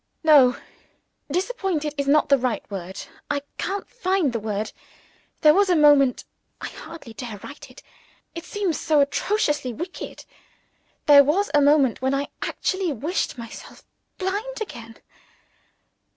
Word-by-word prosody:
No. 280 -6 +6 0.8
"Disappointed" 360 - -1
is 280 -1 -2
not 295 +2 +4
the 280 - +6
word. 200 -7 -4 0.3
I 285 -1 -1 0.2
can't 395 +1 -3
find 370 - 0
the 230 - -1
word. 210 0 -3 0.7
There 305 -1 +7
was 395 +2 +3
a 355 - +4
moment 290 -4 +5 0.4
I - - -5
hardly 315 -7 -11
dare 225 -2 -7
write 285 0 -10
it: 255 - -15 0.5
it 335 - -7
seems 370 -3 -2
so 310 -2 +2
atrociously 295 - 0
wicked 345 +9 -7 0.8
there 285 -1 +8
was 360 +9 +1
a 295 - +5
moment 280 -4 +3
when 265 +1 +1
I 280 +1 -2
actually 375 -3 -1
wished 295 - -2
myself 230 -1 -10 0.3
blind 410 +7 -3
again. 230 - -8
295 Hz, 135 wpm, -23 LUFS, 255-360 Hz, 0.8 s, there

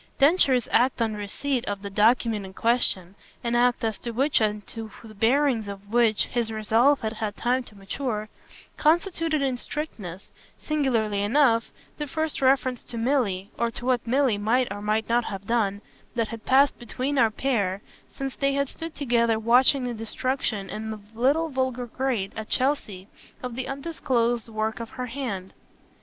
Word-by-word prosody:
Densher's 275 -4 +4
act 250 +2 +3
on 225 -2 +1
receipt 240 +5 -2
of 205 0 -4
the 200 - -4
document 220 0 +3
in 190 0 -9
question 210 -6 +1 0.3
an 235 0 -1
act 245 0 +3
as 220 -2 -1
to 240 - -5
which 265 +3 +2
and 210 -1 0
to 225 -1 -7
the 220 -1 -11
bearings 230 +1 +2
of 200 0 -9
which 230 -3 +4
his 235 -2 -2
resolve 225 +6 +3
had 220 0 -2
had 215 -2 -4
time 250 +2 +1
to 210 - -13
mature 215 +2 -3 0.5
constituted 330 -2 +2
in 260 -2 0
strictness, 210 - -6 0.3
singularly 235 -9 0
enough, 230 +1 +3 0.3
the 295 - -2
first 315 0 -2
reference 260 -2 +2
to 235 - -8
Milly, 225 -6 0
or 235 - +2
to 240 - -8
what 250 -2 +1
Milly 255 -4 +2
might 240 +5 +2
or 205 - -7
might 215 +1 0
not 235 0 +2
have 200 -2 -6
done, 205 -3 0 0.3
that 230 -2 0
had 230 -1 -8
passed 275 +2 +4
between 255 +4 -2
our 230 - +5
pair 210 -5 -1 0.3
since 270 -1 -5
they 275 0 +1
had 280 -1 0
stood 330 -1 -7
together 235 -5 +2
watching 250 +4 +4
the 245 -1 -2
destruction, 225 -2 -2
in 220 +1 -5
the 215 -1 -5
little 280 +8 +2
vulgar 260 -2 -1
grate 240 -5 -2
at 220 -1 -6
Chelsea, 220 -8 0 0.4
of 250 -1 -4
the 260 +1 -3
undisclosed 255 -6 -1
work 220 +1 -2
of 230 -1 -6
her 255 -1 -5
hand. 230 -7 -5
235 Hz, 175 wpm, -26 LUFS, 215-265 Hz, 0.5 s, our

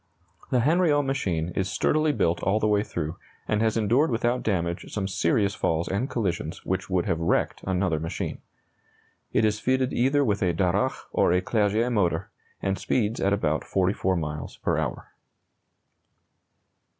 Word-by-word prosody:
The 125 -2 +2
Hanriot 150 0 +3
machine 90 -12 -1
is 95 +1 -2
sturdily 155 - +2
built 85 - 0
all 100 +3 +2
the 110 - 0
way 105 -1 +3
through, 85 -6 -4 0.3
and 105 0 +1
has 110 0 +1
endured 120 +8 +3
without 120 +1 0
damage 85 -4 -2
some 100 -2 -2
serious 100 +2 +1
falls 80 -2 0
and 105 +8 -1
collisions 90 - -3
which 95 +1 -2
would 90 -2 +1
have 80 - 0
wrecked 85 - 0
another 90 -4 +1
machine. 80 +1 -4 0.9
It 110 - +3
is 105 -1 +1
fitted 130 +1 +1
either 135 +3 +2
with 105 -4 0
a 90 -3 +1
Darracq 95 +8 0
or - - +3
a 90 - +4
Clerget 110 +4 +1
motor, 90 -7 0 0.3
and 95 0 0
speeds 115 -2 0
at 100 - +2
about 80 -6 0
44 95 0 0
miles 75 -3 -4
per - - 0
hour. - - -4
100 Hz, 160 wpm, -26 LUFS, 90-120 Hz, 0.9 s, a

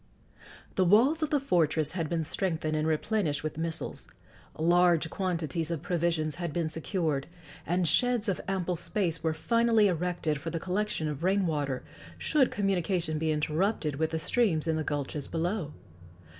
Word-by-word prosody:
The 190 - +5
walls 240 - +4
of 310 - 0
the 290 - +2
fortress 160 - +2
had 165 -4 -2
been 165 -2 0
strengthened 160 -2 -1
and 155 +1 0
replenished 160 -1 0
with 155 0 -4
missiles; 165 0 -4 0.5
large 170 0 +3
quantities 170 -3 -2
of 165 -2 -3
provisions 170 -4 0
had 170 -2 -2
been 165 +1 -1
secured, 155 -3 -2 0.4
and 175 +1 +1
sheds 240 - +2
of 195 - 0
ample 185 -2 -1
space 170 -1 -1
were 160 -1 0
finally 230 +4 +3
erected 170 -4 -1
for 165 - -4
the 165 - -3
collection 185 -2 -1
of 150 +1 -4
rain 190 +1 +2
water, 145 -5 -1 0.3
should 290 -5 +2
communication 180 -5 0
be 160 0 0
interrupted 155 0 0
with 160 +1 +1
the 160 - -2
streams 165 -2 +1
in 160 - +2
the 155 - -1
gulches 145 -1 -3
below. 170 -1 -2
170 Hz, 160 wpm, -29 LUFS, 155-190 Hz, 0.5 s, The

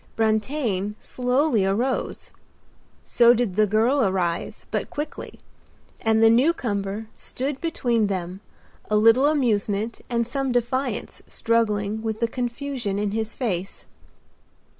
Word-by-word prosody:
Brantain 220 -2 0
slowly 250 -2 +1
arose; 225 +7 -1 0.7
so 240 0 +5
did 225 -6 -1
the 215 0 +4
girl 230 +7 +2
arise, 185 -4 -1
but - - -2
quickly, 295 +1 -6 0.6
and 220 0 +3
the 225 - +8
newcomer 225 -6 +1
stood 270 +1 -4
between 240 -9 +1
them, 185 -1 -4 0.5
a 215 - +2
little 225 +6 +5
amusement 220 -6 0
and 235 -1 0
some 270 +2 -2
defiance 245 +3 -2
struggling 220 -2 0
with 220 -1 -3
the 230 - +1
confusion 245 -3 -3
in 205 0 -1
his 220 +1 -3
face. 195 -7 -3
225 Hz, 120 wpm, -24 LUFS, 205-250 Hz, 0.7 s, the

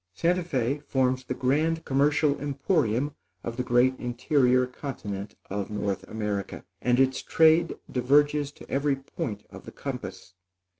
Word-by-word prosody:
Santa 175 - +2
Fé 135 -3 -1
forms 130 -2 +1
the 130 - -4
grand 155 +6 +1
commercial 145 +1 +2
emporium 140 - 0 0.3
of 115 - -4
the 125 - -1
great 125 +1 +3
interior 125 +1 +2
continent 110 -6 -6
of 100 0 -3
North 100 -2 -2
America; 105 -3 -4 0.2
and 125 0 +2
its 130 0 +3
trade 160 +1 +4
diverges 145 +3 +2
to - - -14
every 140 +1 +1
point 135 -5 -6
of - - -11
the - - -9
compass. 100 -9 -7
130 Hz, 140 wpm, -27 LUFS, 120-145 Hz, 0.3 s, trade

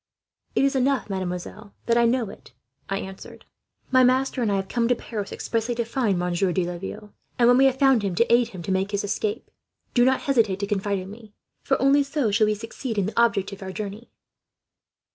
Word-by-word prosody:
"'It - - +3
is 275 - +1
enough, 265 -4 +1
mademoiselle, 190 +3 -5
that 235 - +2
I 235 0 +4
know 235 -1 +1
it,' - - -16 0.4
I 195 0 -3
said. - - -13 0.5
'My 255 0 +6
master 255 +1 +2
and 220 -3 +1
I - - +2
have 195 0 -2
come 235 +2 0
to 245 - +3
Paris, 210 -4 -6
expressly 230 +1 -2
to 235 0 -1
find 225 -5 0
Monsieur 180 +1 0
de 180 0 0
Laville; 195 +4 -7 0.2
and 235 - +4
when 245 - +6
we 270 - +6
have 265 -1 +3
found 270 -4 +4
him, 195 -3 -2
to 235 +4 +3
aid 240 0 +4
him 180 -3 -9
to 190 - -3
make 190 +1 0
his 205 -1 -2
escape. 210 +3 -3 0.4
Do 240 - +4
not 260 +1 +3
hesitate 230 -8 +2
to - - 0
confide 200 0 -1
in 185 +1 -7
me, 215 -1 -14 0.3
for 270 - 0
only 275 +2 +4
so 280 -5 -1
shall 215 +1 +3
we 215 - +1
succeed 225 +2 -6
in 200 - +2
the 220 +3 +1
object 215 -5 +1
of 200 - -10
our 190 -1 -5
journey.' 210 +3 -7
220 Hz, 220 wpm, -24 LUFS, 195-245 Hz, 0.5 s, My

